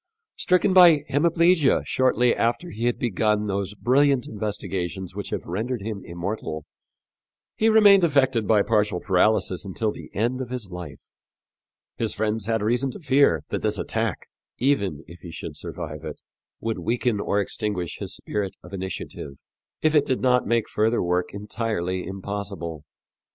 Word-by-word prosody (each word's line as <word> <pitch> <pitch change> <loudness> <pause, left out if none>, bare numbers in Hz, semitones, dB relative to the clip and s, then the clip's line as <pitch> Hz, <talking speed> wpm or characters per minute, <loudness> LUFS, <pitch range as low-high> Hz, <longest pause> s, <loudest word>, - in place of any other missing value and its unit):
Stricken 185 +1 +2
by 170 -5 +7
hemiplegia 165 +1 +3
shortly 125 -2 +2
after 120 +10 -1
he 115 +3 -4
had 120 - +1
begun 105 -2 +1
those 100 0 -2
brilliant 130 +4 +3
investigations 95 -3 -4
which 100 +1 -5
have - - -4
rendered 110 +5 -3
him 105 -2 -4
immortal, 85 -3 -5 0.9
he 225 - +3
remained 205 -3 +7
affected 130 - +2
by 105 -1 +4
partial 105 -4 +1
paralysis 95 0 +2
until 105 +2 -2
the - - -10
end 120 +5 0
of 125 - -5
his 120 -7 -5
life. 90 -6 -8 0.9
His 115 -2 -1
friends 110 0 -1
had 115 -2 0
reason 120 +5 +1
to - - -9
fear 140 -3 +3
that - - -2
this - - 0
attack, - - -2 0.3
even 100 - 0
if 85 +2 -13
he 85 - -10
should - - -7
survive 75 +1 -7
it, 75 -2 -7 0.4
would 115 -1 -3
weaken 120 -1 0
or 100 0 0
extinguish 100 -4 -2
his - - -3
spirit 100 -2 -3
of 90 - -13
initiative, 95 -6 -6 0.5
if 155 0 +3
it 145 -2 +4
did 130 - 0
not 125 -1 +2
make 115 -2 +1
further 110 +2 +1
work 90 0 0
entirely 100 -4 -3
impossible. 95 -5 -5
110 Hz, 155 wpm, -24 LUFS, 95-130 Hz, 0.9 s, by